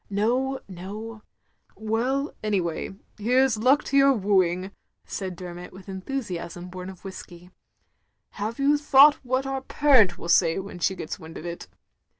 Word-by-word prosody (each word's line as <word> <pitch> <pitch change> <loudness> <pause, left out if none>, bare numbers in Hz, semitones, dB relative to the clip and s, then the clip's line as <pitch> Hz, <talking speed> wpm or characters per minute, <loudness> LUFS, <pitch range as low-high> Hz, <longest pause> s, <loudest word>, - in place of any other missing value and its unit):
" - - -37
"No, 245 +7 0
no—" 210 +4 -8 0.6
"Well 245 +6 -1
— - - -37
anyway, 190 -4 -1 0.2
here 250 +5 +4
's 245 - -1
luck 260 +6 +4
to 280 - 0
yotir 275 -3 +5
wooing, 185 -1 +1 0.2
" - - -52
said 190 -2 -5
Dermot 175 0 -8
with 190 0 -13
the - - -8
enthusiasm 185 -5 -5
bom 185 0 -7
of 190 0 -13
whiskey. 180 -2 -10 0.8
"Have 215 +3 -4
you 285 +1 +3
thought 290 0 +6
what 260 +1 0
our 270 0 -2
parent 260 -10 +4
will - - -8
say 170 -1 +4
when 195 -2 -6
she 190 +3 +1
gets 155 - -6
wind 160 0 -10
of 160 - -9
it?" 170 0 -6
205 Hz, 170 wpm, -25 LUFS, 180-260 Hz, 0.8 s, thought